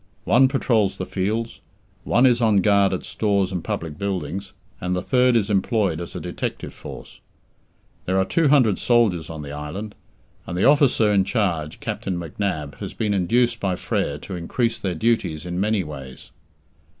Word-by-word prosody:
One 130 +3 +5
patrols 115 -7 +1
the 95 - -3
fields, 110 +6 -2 0.4
one 120 - +4
is 120 -2 +4
on 110 -4 +4
guard 100 0 +4
at 95 - -3
stores 100 -3 0
and 90 -3 -3
public 80 -2 -4
buildings, 95 -1 -3 0.3
and 90 0 -1
the 90 - -1
third 125 -1 +3
is 105 -4 +2
employed 100 -4 +1
as 85 - -8
a - - -3
detective - - -5
force. - - -10 0.9
There 95 +1 0
are 95 - +3
two 165 - +2
hundred 125 -9 +4
soldiers 105 -10 +2
on 80 -2 -6
the 70 - -7
island. 75 +9 -6 0.5
And 85 - -4
the 95 - +2
officer 135 -7 +4
in 100 -2 +4
charge, 85 -9 -1
Captain 95 -2 -3
McNab, 80 -3 -4
has - - -6
been 105 -2 0
induced 115 +5 +2
by 95 -3 0
Frere 70 -4 -2
to 95 - -6
increase 115 +7 -1
their 95 -3 -2
duties 90 -6 0
in 90 0 -3
many 105 -1 +1
ways. 70 -5 -10
100 Hz, 175 wpm, -23 LUFS, 85-115 Hz, 0.9 s, One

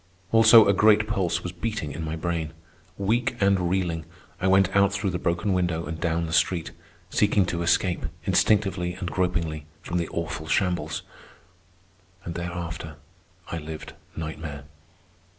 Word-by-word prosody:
Also, 115 -1 +8
a 100 - +5
great 105 +1 +4
pulse 95 -5 -1
was 90 - -4
beating 90 -4 -4
in 80 - -5
my 80 0 -3
brain. 80 -1 -3 0.4
Weak 120 +5 0
and 100 -3 +2
reeling, 85 -3 -1 0.4
I 95 - 0
went 95 0 +4
out 100 0 +5
through 100 -1 -1
the 90 - -2
broken 85 +4 0
window 85 -3 0
and 80 +2 -5
down 85 -1 0
the 80 - -5
street, 85 0 +1 0.4
seeking 105 -2 +3
to 85 -1 -2
escape, 85 +1 +1 0.2
instinctively 95 -4 +2
and 90 -1 -5
gropingly, 85 -4 -1 0.2
from 90 0 -2
the 85 - -2
awful 80 -2 -4
shambles. 85 -5 0 1.2
And 85 - -4
thereafter 85 -2 -5 0.6
I 85 - -2
lived 80 0 -8 0.2
nightmare. 80 -2 -6
90 Hz, 150 wpm, -25 LUFS, 80-95 Hz, 1.2 s, Also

